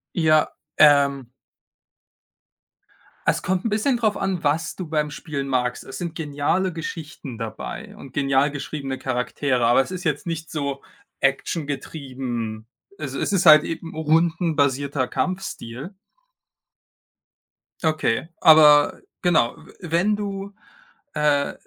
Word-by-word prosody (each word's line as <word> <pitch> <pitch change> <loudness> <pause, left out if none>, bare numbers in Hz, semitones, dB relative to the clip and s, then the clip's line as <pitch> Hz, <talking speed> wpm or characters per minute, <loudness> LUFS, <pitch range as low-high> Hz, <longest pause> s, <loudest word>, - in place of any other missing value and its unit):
Ja, 155 -3 +3 0.3
ähm 140 -4 +4 1.9
Es - - +2
kommt 185 +2 -1
'n - - +2
bisschen 220 +5 +1
drauf 215 -3 +1
an, 190 -4 -2
was 160 +3 0
du 180 -4 -6
beim 150 -1 -1
Spielen 140 -3 -5
magst. 125 -2 -1
Es 135 - -8
sind 170 -2 -5
geniale 160 +5 -1
Geschichten 155 -6 -7
dabei 110 -1 -7
und 135 - -12
genial 140 0 +2
geschriebene 140 -2 -5
Charaktere, 125 0 -1
aber 120 +3 +5
es 135 - -6
ist 185 -1 -5
jetzt 150 -4 -1
nicht 165 -1 -4
so 140 -2 -3 0.4
Action-getrieben. 135 -6 -3 0.3
Also, 140 -3 -5
es - - -1
ist 190 -2 +2
halt 155 -1 +9
eben 165 0 -5
'n - - -12
rundenbasierter 155 -4 +1
Kampfstil. 185 - -4 1.9
Okay, 155 -3 0
aber 150 -3 +7 0.2
genau, 175 -10 +2
äh, - - -16
wenn 175 +5 +1
du, 200 -1 -5 0.6
äh 145 -1 +1
150 Hz, 120 wpm, -23 LUFS, 135-170 Hz, 1.9 s, halt